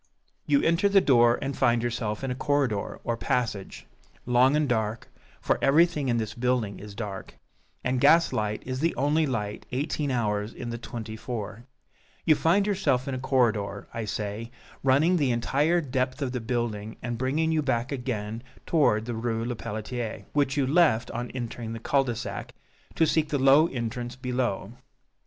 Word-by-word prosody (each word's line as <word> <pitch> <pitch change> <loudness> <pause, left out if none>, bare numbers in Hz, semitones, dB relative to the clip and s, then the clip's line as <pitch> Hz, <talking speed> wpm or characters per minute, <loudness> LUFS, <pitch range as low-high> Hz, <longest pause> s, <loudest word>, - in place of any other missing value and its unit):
You 285 - +3
enter 170 +5 +3
the 200 0 +6
door, 120 -8 +4
and 135 0 -3
find 120 -2 +2
yourself 115 -2 -2
in 135 - -2
a - - 0
corridor 135 -6 -1
or 120 - -1
passage, 115 - -2 0.4
long 125 +3 +4
and 150 -1 +2
dark, 110 -2 -1 0.3
for - - 0
everything 150 0 +4
in 120 - +2
this 110 -2 -2
building 120 -4 -1
is 105 0 -10
dark, 100 -3 -6 0.5
and 125 0 0
gaslight 140 -9 +3
is 130 0 -3
the 165 +3 +1
only 150 +3 +2
light 105 -5 -3
eighteen 145 +2 -1
hours 105 -3 -1
in 120 -1 -5
the 115 - -5
twenty 110 -2 -6
four; 110 0 -6 0.6
you 160 - +6
find 170 +6 +3
yourself 160 -11 +1
in 135 - -2
a 130 - -3
corridor, 115 -7 0
I 115 -1 -3
say, 105 +2 -4 0.3
running 145 +7 +4
the 145 -5 +2
entire 145 +8 +2
depth 130 -1 -2
of 130 - -2
the 125 -2 -3
building, 110 -2 -3
and 120 0 -2
bringing 140 +7 0
you 160 -1 +2
back 125 -3 -1
again 115 -4 -3 0.2
toward 115 -9 +2
the 120 - -3
Rue 115 0 -2
Lepelletier, 110 -2 -4
which 145 -1 +1
you 140 - +3
left 135 -6 +3
on 120 +1 -4
entering 120 -2 -5
the 115 - -5
cul 135 +4 +2
de 120 -2 -2
sac, 115 - -6 0.4
to 165 - +4
seek 155 0 +1
the 145 - 0
low 135 +4 +6
entrance 120 -2 -4
below. 125 -6 -2
125 Hz, 175 wpm, -27 LUFS, 115-140 Hz, 0.6 s, the